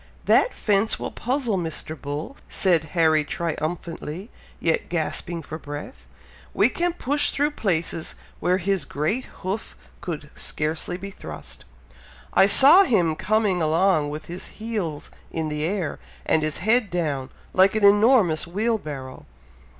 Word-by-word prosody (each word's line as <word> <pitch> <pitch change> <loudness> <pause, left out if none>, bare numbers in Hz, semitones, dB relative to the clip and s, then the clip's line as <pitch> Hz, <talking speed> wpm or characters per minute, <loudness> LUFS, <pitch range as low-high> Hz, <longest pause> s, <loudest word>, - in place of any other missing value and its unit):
"That - - +4
fence 210 +1 +1
will - - -5
puzzle 245 -5 -1
Mr. 160 -2 -5
Bull," 145 - -6
said 170 -5 +2
Harry 160 -2 +4
triumphantly, 165 +4 -4 0.3
yet 165 -1 0
gasping 170 0 -3
for 155 +2 -7
breath. 145 - -8 0.5
"We 210 - +4
can 345 +5 -1
push 290 -2 0
through 290 +2 0
places 165 - -2 0.2
where 180 +1 +2
his 190 -2 0
great 155 - -2 0.2
hoof 195 +4 -4 0.2
could 160 -4 -6
scarcely 155 +3 -2
be 195 +2 -7
thrust! - - -10 0.7
I 190 - +6
saw 275 - +9
him 180 - +2
coming 210 -1 +1
along, 160 -1 +2
with 150 +1 -6
his 175 +2 -5
heels 210 -10 -4
high - - -23 0.2
in 160 -1 -2
the 150 0 -2
air, 185 -2 -2 0.3
and 160 - +2
his 155 -1 -1
head 225 -1 +3
down, 150 -7 -2 0.2
like 190 +2 +4
an 215 -2 +3
enormous 205 -6 +4
wheel 220 +6 0
barrow." 135 -6 -8
175 Hz, 140 wpm, -24 LUFS, 155-215 Hz, 0.7 s, saw